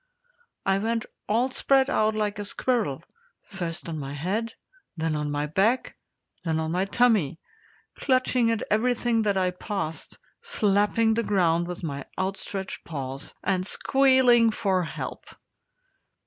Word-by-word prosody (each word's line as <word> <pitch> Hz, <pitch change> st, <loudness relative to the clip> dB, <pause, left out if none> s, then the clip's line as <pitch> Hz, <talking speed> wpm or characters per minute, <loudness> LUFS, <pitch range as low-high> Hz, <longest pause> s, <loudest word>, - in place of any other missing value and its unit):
I 195 Hz, 0 st, +2 dB
went 225 Hz, +2 st, -1 dB, 0.2 s
all 240 Hz, +5 st, +2 dB
spread 270 Hz, 0 st, +3 dB
out 215 Hz, -6 st, +2 dB
like 210 Hz, -1 st, -1 dB
a 205 Hz, -, -3 dB
squirrel, 215 Hz, -, -1 dB, 0.4 s
first 175 Hz, -4 st, -5 dB
on 160 Hz, -2 st, -4 dB
my 140 Hz, -1 st, -5 dB
head, 205 Hz, -, -2 dB, 0.4 s
then 160 Hz, -1 st, -1 dB
on 150 Hz, 0 st, -2 dB
my 145 Hz, 0 st, -1 dB
back, 200 Hz, -, +1 dB, 0.5 s
then 160 Hz, -2 st, 0 dB
on 160 Hz, 0 st, -2 dB
my 180 Hz, +3 st, +1 dB
tummy, 200 Hz, -, +2 dB, 0.5 s
clutching 255 Hz, -3 st, +2 dB
at 225 Hz, -1 st, 0 dB
everything 235 Hz, +1 st, +2 dB
that 205 Hz, -2 st, +1 dB
I 185 Hz, -1 st, +2 dB
passed, 180 Hz, -3 st, -4 dB, 0.2 s
slapping 220 Hz, -, +2 dB
the 230 Hz, -, +1 dB
ground 175 Hz, -5 st, +2 dB
with 180 Hz, 0 st, -6 dB
my 140 Hz, -3 st, -4 dB
outstretched 190 Hz, 0 st, -3 dB
paws, 135 Hz, -3 st, -5 dB
and 185 Hz, -2 st, +1 dB
squealing 260 Hz, +1 st, +4 dB
for 195 Hz, -4 st, +1 dB
help. 165 Hz, -, -5 dB
200 Hz, 135 wpm, -26 LUFS, 165-230 Hz, 0.5 s, squealing